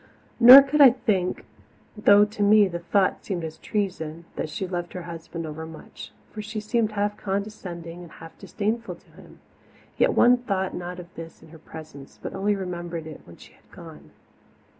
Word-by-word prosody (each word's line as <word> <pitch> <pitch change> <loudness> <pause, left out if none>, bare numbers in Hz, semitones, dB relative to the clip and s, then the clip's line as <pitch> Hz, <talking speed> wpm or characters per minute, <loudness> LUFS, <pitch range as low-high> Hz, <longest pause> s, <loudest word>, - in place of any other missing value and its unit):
Nor 255 +3 +11
could 290 +2 +1
I 275 - +10
think, 215 -8 -2 0.5
though 205 -1 +5
to 210 0 -8
me 205 0 +5
the 175 -2 -5
thought 185 +3 0
seemed 180 -4 -4
as 160 0 -7
treason, 170 -6 -4
that - - -4
she 175 +5 -4
loved 175 -1 -5
her 180 - -6
husband 165 0 -8
overmuch, 160 +1 -10 0.2
for 215 - -7
she 215 +1 -6
seemed 215 0 -1
half 205 0 -2
condescending 190 -4 -6
and 170 -2 -12
half 165 0 -13
disdainful 225 +2 -3
to - - -25
him; - - -17 0.6
yet - - +3
one 245 +1 +5
thought 195 -6 -3
not 175 0 -6
of 175 0 -12
this 165 0 -11
in - - -16
her 160 0 -14
presence, 155 -3 -12
but - - -7
only 205 +2 0
remembered 175 -3 -6
it 155 -1 -10
when 85 - -15
she - - -17
had - - -28
gone. - - -13
185 Hz, 180 wpm, -24 LUFS, 165-210 Hz, 0.6 s, Nor